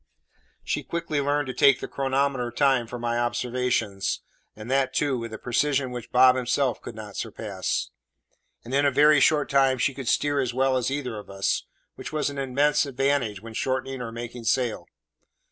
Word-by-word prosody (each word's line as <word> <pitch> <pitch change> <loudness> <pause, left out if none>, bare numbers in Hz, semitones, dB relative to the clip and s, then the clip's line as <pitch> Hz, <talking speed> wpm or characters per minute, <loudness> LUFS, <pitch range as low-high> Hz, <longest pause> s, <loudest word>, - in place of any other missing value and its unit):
She - - -1
quickly 170 -4 -2
learned 145 +1 0
to 130 - -5
take 135 +2 +5
the - - -5
chronometer 135 -2 0
time 130 -1 +2
for 125 - -6
my 120 0 -1
observations, 120 -4 -1 0.3
and 110 +1 -9
that, 135 -1 +1
too, 145 -3 +1
with 115 -1 -6
a 110 - -6
precision 130 +2 0
which 120 -2 -7
Bob 130 0 +6
himself 125 0 0
could 115 - -8
not 105 -2 -9
surpass; 105 -4 -3 0.7
and 120 - -7
in 140 +1 +3
a 140 - +5
very 150 +2 +5
short 150 +1 +3
time 135 -1 +3
she 135 +2 +1
could 135 -2 -7
steer 145 +3 +2
as 125 -3 -1
well 135 0 +2
as 125 -1 0
either 130 -6 -3
of 105 - -13
us, 100 0 -1 0.3
which - - -7
was 150 -2 -1
an 140 - -6
immense 140 +3 +2
advantage 135 -6 0
when 115 -1 -9
shortening 130 +2 -2
or 115 -2 -5
making 120 0 -7
sail. 115 -8 0
130 Hz, 185 wpm, -25 LUFS, 120-140 Hz, 0.7 s, Bob